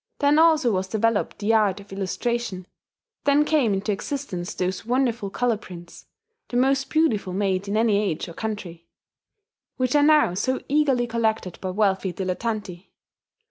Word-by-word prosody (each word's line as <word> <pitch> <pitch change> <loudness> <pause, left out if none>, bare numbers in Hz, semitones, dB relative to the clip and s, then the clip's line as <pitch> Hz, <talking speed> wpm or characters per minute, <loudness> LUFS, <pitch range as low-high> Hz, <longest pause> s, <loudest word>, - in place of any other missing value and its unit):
Then 290 +1 +3
also 315 -7 +4
was 190 -1 -1
developed 220 +1 0
the 210 +2 0
art 210 -3 +2
of 200 -1 -12
illustration; 195 0 -3 0.6
then 290 +1 +4
came 295 -8 +2
into 200 +2 -1
existence 200 -5 -4
those 185 0 -2
wonderful 240 -3 0
colour 240 +2 0
prints 175 -4 -12 0.4
(the 245 - -1
most 270 +2 +2
beautiful 225 - +1
made 195 0 -1
in 205 +2 -1
any 220 -2 +3
age 175 -5 -2
or 170 - -9
country) 180 -6 -6 0.9
which 255 +1 0
are 290 - +5
now 300 - +4
so 255 +8 -1
eagerly 275 -4 +2
collected 220 -6 -1
by 185 - -3
wealthy 190 -1 +1
dilettanti. 190 0 -4
215 Hz, 150 wpm, -24 LUFS, 190-255 Hz, 0.9 s, are